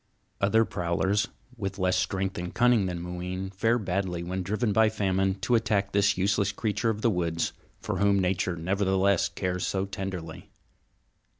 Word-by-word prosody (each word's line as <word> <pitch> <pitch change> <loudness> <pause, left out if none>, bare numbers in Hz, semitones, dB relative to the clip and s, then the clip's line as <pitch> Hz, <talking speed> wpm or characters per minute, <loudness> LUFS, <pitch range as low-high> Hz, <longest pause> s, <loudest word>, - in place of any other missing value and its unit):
Other 110 +3 +4
prowlers, 95 +3 0 0.3
with 95 -3 -4
less 95 -1 +1
strength 95 -1 -1
and 90 0 -4
cunning 120 -5 +4
than 90 -1 -3
Mooween, 90 +2 -4
fare 115 +5 +2
badly 90 -4 -2
when 90 +2 -3
driven 105 +3 0
by 110 0 +5
famine 95 -3 0
to 125 - 0
attack 100 -3 +2
this 100 -1 +3
useless 100 +1 +1
creature 110 +2 -1
of 110 -1 -2
the 115 - +4
woods, 85 -3 -1 0.3
for 95 - -3
whom 100 0 +4
Nature 90 -1 0
nevertheless 95 +2 +1
cares 90 -1 -2
so 95 0 -1
tenderly. 95 -4 -6
95 Hz, 160 wpm, -27 LUFS, 90-105 Hz, 0.3 s, by